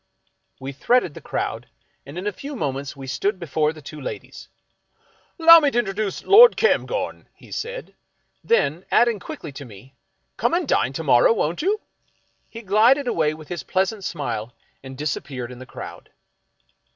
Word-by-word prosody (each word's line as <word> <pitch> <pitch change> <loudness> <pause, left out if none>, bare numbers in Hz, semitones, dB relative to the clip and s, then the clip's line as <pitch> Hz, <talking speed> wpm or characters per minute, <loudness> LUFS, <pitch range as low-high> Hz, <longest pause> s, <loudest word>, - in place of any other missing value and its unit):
We 135 +1 -6
threaded 180 - +1
the - - -11
crowd, - - -4 0.4
and 145 +5 -9
in 185 - -5
a 210 - 0
few 280 +8 -8
minutes 140 - -3
we 135 -1 -9
stood 195 +10 -1
be 170 - -6
fore 155 0 +1
the 155 -2 -13
two 150 +1 -9
ladies. 130 - -8 0.5
" - - -37
'Lowmintrduce 240 - +4
L'd 465 +4 +8
Cairngorm," - - 0
he - - -17
said; - - -6 0.5
then, 180 - +1
adding 235 -3 +3
quickly 160 -4 -8
to 140 +1 -9
me, 125 +2 -14 0.2
" - - -49
Come - - +1
and 345 -3 -1
dine 130 - +1
to 160 - -4
morrow, 130 - +5
won't 170 -5 -1
you? 405 +6 +1 0.4
" - - -43
he 230 0 -10
glided 230 +8 +4
away 155 -8 +1
with 155 -1 -13
his 175 -3 -4
pleasant 190 +7 -1
smile 120 -9 -4 0.3
and 130 -1 -10
disappeared 135 -4 -4
in 125 - -10
the 130 - -11
crowd. - - -10
175 Hz, 170 wpm, -22 LUFS, -, 0.5 s, L'd